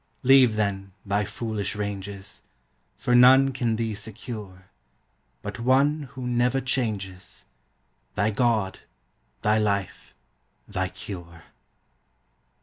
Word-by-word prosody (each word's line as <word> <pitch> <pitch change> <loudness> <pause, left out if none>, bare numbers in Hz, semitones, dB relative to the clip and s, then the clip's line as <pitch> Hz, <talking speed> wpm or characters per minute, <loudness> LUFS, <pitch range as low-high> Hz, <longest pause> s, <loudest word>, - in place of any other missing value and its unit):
Leave, 130 -3 +6
then, 100 -2 -2
thy 100 +1 +1
foolish 105 -1 -3
ranges; 100 -1 -5 0.6
For 125 - 0
none 130 +2 +7
can 120 -3 0
thee 110 -1 -2
secure, 105 -3 -8 0.7
But - - -6
one 140 +4 +2
who 130 - -4
never 125 +2 +2
changes 105 -8 -3 0.7
Thy 105 +1 +1
God, 110 -3 +1 0.6
thy 105 +1 +3
life, 100 -3 -2 0.5
thy 95 0 -2
cure. 85 -3 -9
110 Hz, 100 wpm, -25 LUFS, 100-125 Hz, 0.7 s, none